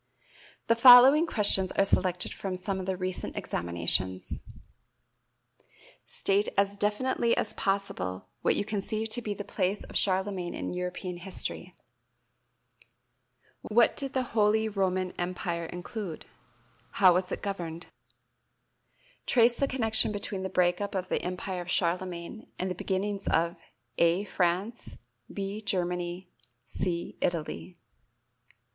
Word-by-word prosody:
The 230 - +3
following 255 +6 +9
questions 195 - +3
are 195 - +3
selected 180 -2 +1
from 190 -2 -4
some 190 +1 -2
of 185 - -5
the 190 -1 -1
recent 185 0 -4
examinations: 85 +2 0 1.7
State 200 +1 +1
as 200 0 +2
definitely 230 +4 +1
as 215 - -1
possible 95 - -2
what - - +2
you 205 - -1
conceive 215 +1 -2
to 240 +2 +3
be 210 -3 -3
the 205 - -5
place 195 +1 -1
of - - -12
Charlemagne 190 -2 0
in - - -4
European 180 0 -4
history. 185 +2 -5 1.9
What 230 +2 +3
did 275 -1 -5
the 260 - +1
Holy 220 0 +3
Roman 185 -3 -1
Empire 175 -1 -3
include? 180 0 -6 0.7
How 185 -3 +6
was 180 +1 -1
it - - -4
governed? 175 -4 -4 1.4
Trace 240 -1 +4
the 275 - 0
connection 225 -5 +2
between 205 -1 -4
the 190 - -3
break 180 0 +2
up 200 -1 -3
of 185 -1 -3
the - - 0
Empire 180 +1 -4
of 175 - -9
Charlemagne 180 +3 -2
and 185 0 -2
the - - 0
beginnings 195 +2 -3
of 170 +1 +1 0.4
(a) 170 +3 +3
France, 190 +4 -2 0.3
(b) 200 +2 -4
Germany, 180 -2 -2 0.4
(c) 170 -2 -3
Italy. 175 +1 -3
190 Hz, 125 wpm, -28 LUFS, 180-210 Hz, 1.9 s, following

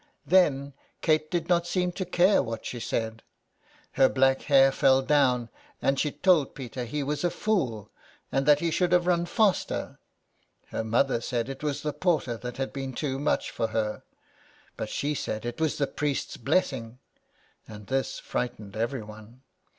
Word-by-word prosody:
Then 140 -7 +3 0.3
Kate 155 -1 +2
did 170 -2 -1
not 175 -1 +2
seem 180 0 0
to 185 +1 -4
care 180 +3 +4
what 115 -3 -5
she 120 - -5
said. 110 -1 -3 0.7
Her 135 -1 +4
black 135 0 +3
hair 135 -2 +5
fell 135 -1 +4
down, 130 -5 +2 0.3
and 135 0 +1
she 150 - +1
told 160 -2 +2
Peter 125 -2 -5
he 145 +5 -3
was 145 +2 -2
a 175 - +3
fool, 135 - -1 0.4
and 135 +1 0
that 150 -1 +6
he 170 -1 0
should 180 +2 +1
have 175 -1 +4
run 175 -1 +2
faster. 210 -2 0 0.7
Her - - -3
mother 115 +2 +1
said 120 +1 -2
it 135 0 -7
was 150 -2 -2
the 150 -1 -2
porter 155 -9 0
that 125 +1 -7
had 135 0 -3
been 135 -1 -4
too 135 0 -2
much 145 - 0
for 115 - -1
her; 110 -1 -2 0.7
but 110 - -5
she 145 +6 -1
said 110 -5 -4
it 120 +6 -5
was 160 -2 +1
the 145 - +2
priest's 145 0 -2
blessing, 125 -4 -1 0.7
and 105 -1 -10
this 135 +5 -1
frightened 110 -5 -4
everyone. 110 0 -5
135 Hz, 170 wpm, -27 LUFS, 120-155 Hz, 0.7 s, that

